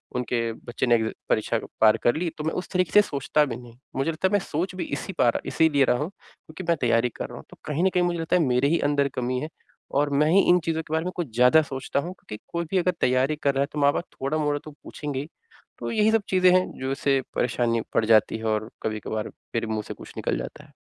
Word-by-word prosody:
उनके 120 Hz, -2 st, -1 dB
बच्चे 120 Hz, +3 st, -4 dB
ने 120 Hz, -, +5 dB
अ, -, -, -6 dB, 0.2 s
परीक्षा 110 Hz, +1 st, +1 dB, 0.2 s
पार 110 Hz, 0 st, +6 dB
कर 120 Hz, -, +3 dB
ली 170 Hz, +1 st, -1 dB
तो 150 Hz, -, -4 dB
मैं 160 Hz, -, -1 dB
उस -, -, -13 dB
तरीके 180 Hz, -3 st, +1 dB
से 210 Hz, -, +7 dB
सोचता 150 Hz, -4 st, +1 dB
भी 125 Hz, -5 st, -4 dB
नहीं। 120 Hz, -1 st, -11 dB, 0.2 s
मुझे 135 Hz, +5 st, 0 dB
लगता 170 Hz, +4 st, 0 dB
है -, -, -4 dB
मैं 205 Hz, -, +5 dB
सोच 180 Hz, +2 st, -3 dB
भी 185 Hz, -, -3 dB
इसी 190 Hz, -, -6 dB
पा 125 Hz, -, +3 dB
रहा -, -, -1 dB
इसीलिए 145 Hz, -4 st, +3 dB
रहा 125 Hz, -, +2 dB
हूँ 150 Hz, +6 st, -2 dB
क्योंकि 185 Hz, -3 st, -13 dB
मैं 170 Hz, -, +5 dB
तैयारी 115 Hz, 0 st, +3 dB
कर -, -, -4 dB
रहा -, -, -9 dB
हूँ। -, -, -10 dB
तो -, -, -15 dB
कहीं 155 Hz, +2 st, -1 dB
न 190 Hz, -, +5 dB
कहीं 180 Hz, -, +4 dB
मुझे 175 Hz, -1 st, 0 dB
लगता 165 Hz, +2 st, 0 dB
है 180 Hz, -, +4 dB
मेरे 125 Hz, +1 st, +2 dB
ही 170 Hz, -, +2 dB
अंदर 140 Hz, -1 st, +2 dB
कमी 125 Hz, 0 st, -1 dB
है 155 Hz, -, -4 dB, 0.5 s
और 145 Hz, 0 st, +2 dB
मैं 155 Hz, -, +2 dB
ही 195 Hz, +3 st, +6 dB
इन 180 Hz, 0 st, +6 dB
चीज़ों 160 Hz, -1 st, 0 dB
के 155 Hz, -, -7 dB
बारे 160 Hz, +1 st, 0 dB
में 180 Hz, -, -2 dB
कुछ 160 Hz, -10 st, -4 dB
ज़्यादा 125 Hz, +6 st, +6 dB
सोचता 135 Hz, -1 st, -3 dB
हूँ 175 Hz, +5 st, -4 dB
क्योंकि 105 Hz, -11 st, -10 dB, 0.2 s
कोई 170 Hz, 0 st, -1 dB
भी 195 Hz, -, +2 dB
अगर 180 Hz, 0 st, +2 dB
तैयारी 130 Hz, +4 st, +2 dB
कर 140 Hz, -, +3 dB
रहा 135 Hz, -, +2 dB
है 140 Hz, -, +1 dB
तो 150 Hz, -, -3 dB
माँ-बाप 145 Hz, +4 st, +2 dB, 0.2 s
थोड़ा-मोड़ा 145 Hz, +1 st, 0 dB
तो 155 Hz, -, -8 dB
पूछेंगे 145 Hz, -3 st, -5 dB
ही। 145 Hz, -, -5 dB, 0.5 s
तो -, -, -4 dB
यही 220 Hz, -1 st, +3 dB
सब 225 Hz, -, +3 dB
चीज़ें 185 Hz, -1 st, +5 dB
हैं 185 Hz, 0 st, +4 dB
जो 130 Hz, +1 st, -2 dB
उसे 135 Hz, 0 st, +1 dB, 0.2 s
परेशानी 120 Hz, -1 st, +1 dB
पड़ 110 Hz, -, +2 dB
जाती 110 Hz, 0 st, +4 dB
है 110 Hz, -, -7 dB
और 110 Hz, 0 st, 0 dB
कभी-कभार 110 Hz, 0 st, -3 dB, 0.3 s
मेरे 115 Hz, -1 st, 0 dB
मुँह 110 Hz, -1 st, -2 dB
से -, -, -5 dB
कुछ -, -, -12 dB
निकल -, -, -1 dB
जाता -, -, -7 dB
है। -, -, -21 dB
145 Hz, 265 wpm, -25 LUFS, 120-170 Hz, 0.5 s, से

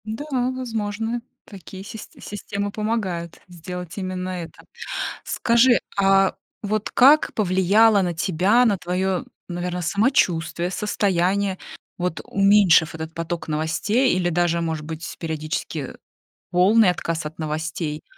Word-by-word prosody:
Да, 220 Hz, +7 st, -5 dB
возможно, 235 Hz, -3 st, -2 dB, 0.2 s
такие 190 Hz, -1 st, -10 dB
сист 215 Hz, +1 st, -10 dB
системы 205 Hz, 0 st, -4 dB
помогают 200 Hz, -6 st, -3 dB
сделать 180 Hz, 0 st, -8 dB
именно 185 Hz, -1 st, -3 dB
это. 175 Hz, -3 st, -7 dB, 0.6 s
Скажи, 235 Hz, +1 st, +3 dB, 0.2 s
а 195 Hz, -1 st, +4 dB, 0.3 s
вот 215 Hz, 0 st, -2 dB
как 285 Hz, +5 st, +5 dB
повлияло 200 Hz, +2 st, +4 dB
на 175 Hz, -2 st, -1 dB
тебя, 185 Hz, +9 st, +2 dB
на 205 Hz, -4 st, +2 dB
твоё, 185 Hz, +1 st, -1 dB, 0.2 s
наверное, 180 Hz, 0 st, -3 dB
самочувствие, 175 Hz, -, +1 dB
состояние, 195 Hz, -1 st, 0 dB, 0.4 s
вот 180 Hz, -2 st, -2 dB
уменьшив 195 Hz, -5 st, +4 dB
этот 160 Hz, 0 st, -6 dB
поток 165 Hz, +1 st, -4 dB
новостей 160 Hz, -, +1 dB
или 180 Hz, -1 st, +1 dB
даже, 170 Hz, 0 st, +1 dB
может 160 Hz, -2 st, -3 dB
быть, 160 Hz, +1 st, -6 dB
периодически 155 Hz, -2 st, -4 dB, 0.6 s
полный 190 Hz, +4 st, +5 dB
отказ 165 Hz, -2 st, -3 dB
от 150 Hz, -, -8 dB
новостей, 155 Hz, 0 st, -3 dB
185 Hz, 115 wpm, -23 LUFS, 170-210 Hz, 0.6 s, как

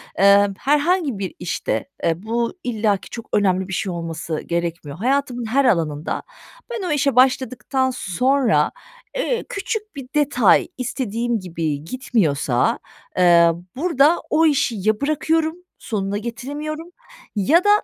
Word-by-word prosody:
emm, 200 Hz, +1 st, +5 dB
herhangi 295 Hz, -, +1 dB
bir 190 Hz, -3 st, -4 dB
işte, 175 Hz, 0 st, -2 dB, 0.2 s
eee, 165 Hz, +4 st, 0 dB
bu 235 Hz, +1 st, -1 dB
illaki 215 Hz, -4 st, 0 dB
çok 230 Hz, -1 st, -8 dB
önemli 190 Hz, -2 st, +2 dB
bir 190 Hz, -, -6 dB
şey 190 Hz, -, -1 dB
olması 165 Hz, -2 st, -4 dB
gerekmiyor. 170 Hz, -3 st, -3 dB
Hayatımın 250 Hz, +1 st, 0 dB
her 270 Hz, +5 st, +2 dB
alanında 160 Hz, -, 0 dB, 0.5 s
ben 455 Hz, -6 st, -4 dB
o -, -, -1 dB
işe 280 Hz, -3 st, +1 dB
başladıktan 260 Hz, 0 st, +2 dB
sonra, 245 Hz, -, +1 dB, 0.4 s
eee, -, -, -1 dB
küçük 430 Hz, +2 st, -4 dB
bir 275 Hz, -3 st, -7 dB
detay 280 Hz, -7 st, +4 dB
istediğim 240 Hz, -2 st, -2 dB
gibi 160 Hz, -5 st, -3 dB
gitmiyorsa, 160 Hz, -, 0 dB, 0.4 s
eee, 170 Hz, -2 st, +6 dB, 0.2 s
burada 315 Hz, +1 st, +3 dB
o 325 Hz, -, +3 dB
işi 285 Hz, -6 st, +2 dB
ya 215 Hz, +2 st, +1 dB
bırakıyorum, 315 Hz, +2 st, +1 dB, 0.3 s
sonuna 200 Hz, -3 st, -2 dB
getiremiyorum 290 Hz, +8 st, -5 dB, 0.5 s
ya 295 Hz, -, +4 dB
da 410 Hz, -, +2 dB
235 Hz, 130 wpm, -21 LUFS, 185-280 Hz, 0.5 s, eee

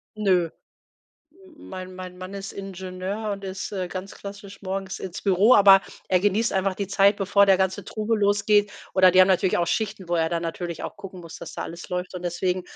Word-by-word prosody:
Nö. 185 Hz, -5 st, +2 dB, 0.8 s
Hm, 370 Hz, -4 st, -17 dB
mein 185 Hz, 0 st, -8 dB
mein 185 Hz, -1 st, -8 dB
Mann 185 Hz, +1 st, -8 dB
ist 195 Hz, 0 st, -6 dB
Ingenieur 190 Hz, +2 st, -5 dB
und 200 Hz, 0 st, -7 dB
ist, 190 Hz, +2 st, -5 dB
äh, 185 Hz, -2 st, -3 dB
ganz 190 Hz, +2 st, -7 dB
klassisch 200 Hz, 0 st, -10 dB
morgens 190 Hz, 0 st, -4 dB
ins 185 Hz, -2 st, -6 dB
Büro, 200 Hz, +5 st, +5 dB
aber 195 Hz, -1 st, +8 dB, 0.3 s
er 185 Hz, -1 st, +3 dB
genießt 205 Hz, +3 st, +1 dB
einfach 190 Hz, 0 st, 0 dB
die 200 Hz, -, -3 dB
Zeit, 200 Hz, +1 st, +4 dB
bevor 200 Hz, 0 st, +4 dB
der 190 Hz, -1 st, +6 dB
ganze 190 Hz, 0 st, 0 dB
Trubel 215 Hz, 0 st, -2 dB
losgeht. 205 Hz, 0 st, +3 dB, 0.2 s
Oder 185 Hz, -1 st, +6 dB
die 185 Hz, +1 st, +6 dB
haben 185 Hz, -, +6 dB
natürlich 185 Hz, -1 st, +2 dB
auch 170 Hz, -, +1 dB
Schichten, 210 Hz, -4 st, -2 dB
wo 175 Hz, -, 0 dB
er 160 Hz, -1 st, +2 dB
dann 170 Hz, 0 st, -2 dB
natürlich 170 Hz, 0 st, -5 dB
auch -, -, -6 dB
gucken 190 Hz, -2 st, -10 dB
muss, 165 Hz, -1 st, -10 dB
dass -, -, -9 dB
da -, -, -4 dB
alles 170 Hz, +1 st, -9 dB
läuft. 180 Hz, 0 st, -4 dB
Und 180 Hz, -, -6 dB
deswegen 180 Hz, +1 st, -1 dB
190 Hz, 210 wpm, -24 LUFS, 185-200 Hz, 0.8 s, aber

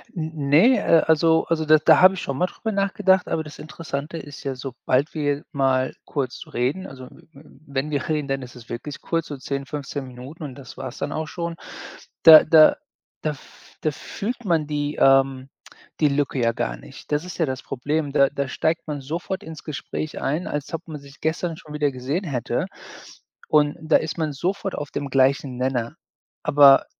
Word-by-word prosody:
N 160 Hz, -1 st, -3 dB, 0.2 s
Ne, 225 Hz, -, +6 dB
äh, 165 Hz, -, +4 dB
also 160 Hz, +1 st, +4 dB
also, 160 Hz, -1 st, +1 dB
da 155 Hz, 0 st, +7 dB
da 155 Hz, 0 st, +5 dB
habe 185 Hz, +1 st, +8 dB
ich -, -, -5 dB
schon 135 Hz, -1 st, -3 dB
mal 180 Hz, -, +2 dB
drüber 220 Hz, +5 st, -5 dB
nachgedacht, 195 Hz, -2 st, +2 dB
aber 160 Hz, -, -1 dB
das 150 Hz, -1 st, -11 dB
Interessante 155 Hz, -1 st, -6 dB
ist 145 Hz, -3 st, -9 dB
ja, 135 Hz, -1 st, -3 dB
sobald 130 Hz, +2 st, -1 dB
wir 145 Hz, -2 st, -1 dB
mal 130 Hz, -2 st, +1 dB
kurz 135 Hz, -4 st, -4 dB
reden 135 Hz, +10 st, -1 dB
also, 130 Hz, -1 st, -10 dB
w -, -, -18 dB, 0.2 s
w 140 Hz, +1 st, -15 dB, 0.2 s
wenn 140 Hz, +2 st, -2 dB
wir 145 Hz, -2 st, -1 dB
reden, 150 Hz, -2 st, 0 dB
dann 135 Hz, -1 st, -2 dB
ist 125 Hz, 0 st, -10 dB
es 120 Hz, -2 st, -14 dB
wirklich 130 Hz, +5 st, -6 dB
kurz, 165 Hz, -1 st, -2 dB
so 145 Hz, -, -6 dB
10, 140 Hz, +1 st, -4 dB
15 140 Hz, -1 st, -5 dB
Minuten 130 Hz, +6 st, -10 dB
und 135 Hz, -4 st, -7 dB
das 135 Hz, -1 st, -12 dB
war's 130 Hz, 0 st, -6 dB
dann -, -, -3 dB
auch 155 Hz, 0 st, -3 dB
schon, 170 Hz, 0 st, -4 dB, 0.7 s
da 160 Hz, -1 st, +11 dB
da 155 Hz, -1 st, +7 dB, 0.5 s
da 155 Hz, -, 0 dB
f 145 Hz, -, -15 dB
da 155 Hz, -, +1 dB
fühlt 230 Hz, -, -6 dB
man 165 Hz, -5 st, +1 dB
die, 145 Hz, 0 st, -2 dB
ähm, 135 Hz, 0 st, +4 dB, 0.5 s
die 150 Hz, -, +5 dB
Lücke 140 Hz, -1 st, 0 dB
ja 115 Hz, -1 st, +3 dB
gar -, -, -2 dB
nicht -, -, -14 dB
das 150 Hz, +1 st, +1 dB
ist 180 Hz, -2 st, -8 dB
ja 165 Hz, -, +2 dB
das 130 Hz, -3 st, -4 dB
Problem. 145 Hz, +3 st, -2 dB
Da 140 Hz, -1 st, +5 dB
da 140 Hz, -1 st, -3 dB
steigt 160 Hz, +4 st, -1 dB
man 145 Hz, -2 st, -4 dB
sofort 170 Hz, +7 st, -4 dB
ins 160 Hz, -1 st, -9 dB
Gespräch 155 Hz, +1 st, -5 dB
ein, 155 Hz, +6 st, -1 dB
als 150 Hz, +2 st, -4 dB
ob 165 Hz, +1 st, -5 dB
man 150 Hz, -2 st, -7 dB
sich 140 Hz, +1 st, -16 dB
gestern 160 Hz, +1 st, -1 dB
schon 150 Hz, -1 st, -12 dB
wieder 150 Hz, -1 st, +1 dB
gesehen 135 Hz, +8 st, -3 dB
hätte. 130 Hz, -7 st, -2 dB, 0.8 s
Und 150 Hz, -1 st, +3 dB
da 155 Hz, 0 st, +4 dB
ist 160 Hz, +1 st, -4 dB
man 160 Hz, -2 st, -1 dB
sofort 190 Hz, +6 st, -2 dB
auf 145 Hz, -2 st, -5 dB
dem 140 Hz, -1 st, -4 dB
gleichen 135 Hz, 0 st, +2 dB
Nenner, 125 Hz, -2 st, -1 dB, 0.5 s
aber 140 Hz, -1 st, +7 dB
145 Hz, 200 wpm, -23 LUFS, 135-160 Hz, 0.8 s, da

